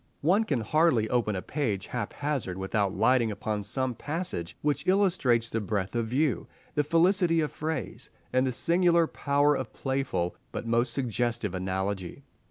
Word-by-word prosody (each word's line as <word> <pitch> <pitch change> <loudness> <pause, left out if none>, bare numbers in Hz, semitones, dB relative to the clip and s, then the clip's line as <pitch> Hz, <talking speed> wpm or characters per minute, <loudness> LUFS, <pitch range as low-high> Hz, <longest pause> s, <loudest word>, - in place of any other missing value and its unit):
One 190 +9 +3
can 140 - 0
hardly 125 -2 +3
open 115 -4 +1
a 95 - -4
page 110 -10 -2
haphazard 125 -3 -3
without 95 +1 -1
lighting 115 +2 +3
upon 105 0 -3
some 125 +5 0
passage 145 - -3
which 145 -1 0
illustrates 170 - +2
the 115 - -1
breadth 100 0 -2
of 115 -1 0
view, 135 +4 0 0.3
the 150 - +2
felicity 165 +2 +3
of 155 -2 0
phrase, 155 -4 -4 0.2
and 130 +1 +3
the - - 0
singular 170 +5 +3
power 145 -1 +2
of - - -5
playful 130 -10 -2 0.2
but - - -5
most 115 +1 +2
suggestive 120 -4 -1
analogy. 95 +4 -3
125 Hz, 155 wpm, -28 LUFS, 105-150 Hz, 0.3 s, One